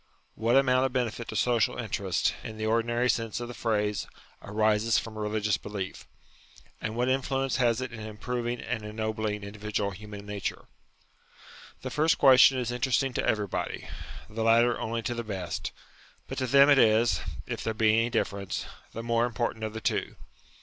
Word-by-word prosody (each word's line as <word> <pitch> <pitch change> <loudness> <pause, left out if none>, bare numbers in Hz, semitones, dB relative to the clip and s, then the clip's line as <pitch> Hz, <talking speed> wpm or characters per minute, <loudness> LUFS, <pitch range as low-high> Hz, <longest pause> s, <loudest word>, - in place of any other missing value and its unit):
What 115 +2 +1
amount 130 -1 +4
of 135 -2 0
benefit 120 -2 -2
to - - -6
social 120 -3 +2
interests, - - 0
in 110 -1 -7
the 110 - -3
ordinary 120 +2 +1
sense 115 -2 0
of 120 - -5
the 120 - -7
phrase, 105 -3 -1 0.3
arises 110 +1 +2
from 110 -1 -3
religious 105 -1 0
belief? 100 -2 -6 0.7
And 110 - -3
what 125 +1 +1
influence 135 0 0
has 120 -2 +2
it 130 -1 -4
in 115 - -7
improving 120 +3 -3
and 120 -3 -3
ennobling 110 -1 -3
indi 100 +1 -9
vidual 105 -1 -2
human 105 +1 -9
nature? 105 -1 -4 1.2
The - - -4
first 155 +1 +3
question 130 -1 +7
is 120 -2 -1
interesting 130 +2 +1
to - - -1
everybody; 105 -3 -1 0.4
the 110 +1 -3
latter 115 +1 +4
only 115 +1 -2
to 120 - -1
the 120 0 -4
best; 95 -6 -4 0.6
but - - -4
to 130 - -1
them 140 +2 +7
it 140 -2 +6
is, 110 -6 +4 0.2
if - - -4
there 110 - -2
be 110 0 +4
any 115 +1 +3
difference, 100 -4 -2 0.3
the 115 - -5
more 115 0 +2
important 115 -1 -2
of 110 -1 -3
the 110 - -5
two. - - -1
115 Hz, 175 wpm, -28 LUFS, 105-120 Hz, 1.2 s, question